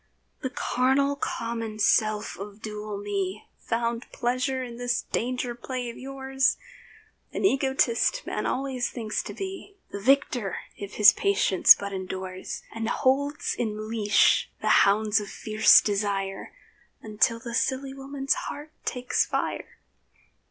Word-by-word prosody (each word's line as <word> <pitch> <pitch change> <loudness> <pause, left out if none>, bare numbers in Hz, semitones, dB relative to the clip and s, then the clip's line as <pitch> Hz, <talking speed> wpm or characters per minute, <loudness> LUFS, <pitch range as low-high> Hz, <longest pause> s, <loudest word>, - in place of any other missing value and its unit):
The 260 - -2
carnal, 265 +2 +1
common 230 -5 -4
self 215 0 +2
of 200 +1 -8
dual 210 -1 -6
me 200 0 -3 0.2
Found 235 +1 -2
pleasure 255 +2 -1
in 240 -2 -8
this 245 0 -1
danger 250 0 -2
play 245 0 -5
of - - -13
yours. 270 0 0 0.7
(An - - -2
egotist, 270 - +2
man - - -2
always 260 -2 -2
thinks 220 -3 -3
to - - -8
be 390 +1 -7
The 200 - -5
victor, 245 -3 +2 0.2
if 200 0 -8
his 210 -1 +8
patience 195 -1 +5
but 200 0 -5
endures, 185 0 -6
And 225 0 -3
holds 285 +3 +1
in 215 -1 -4
leash 215 -2 +3
the - - -1 0.2
hounds 210 +1 +2
of 205 -2 -7
fierce 215 0 +5
desire, 195 -1 -2 0.5
Until 220 +1 +1
the 235 0 -7
silly 265 +2 -1
woman's 270 0 -2
heart 295 +1 -6
takes 250 0 0
fire.) - - -3
235 Hz, 130 wpm, -26 LUFS, 210-265 Hz, 0.7 s, his